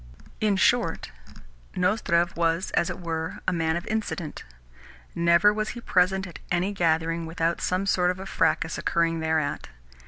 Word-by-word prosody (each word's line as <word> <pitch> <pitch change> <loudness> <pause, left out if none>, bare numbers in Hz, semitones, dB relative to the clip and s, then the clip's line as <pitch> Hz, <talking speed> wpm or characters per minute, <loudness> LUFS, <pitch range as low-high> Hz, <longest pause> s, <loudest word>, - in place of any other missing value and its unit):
In 210 -2 +2
short, 195 -3 +1 0.6
Nozdrev 180 -2 +1
was, 170 +2 0
as 170 - +1
it 175 - -5
were, 165 -2 -4
a - - +2
man 160 -1 0
of 170 - -4
incident. 205 -7 -4 0.7
Never 170 +5 +4
was 215 0 -2
he - - -5
present 190 -1 +2
at 180 - -10
any 180 +3 0
gathering 165 -2 0
without 165 +1 -1
some 185 +2 0
sort 180 -2 +2
of 180 - -1
a 190 - -6
fracas 160 -3 0
occurring 165 -1 +1
thereat. 160 - -1
170 Hz, 155 wpm, -26 LUFS, 165-190 Hz, 0.7 s, Never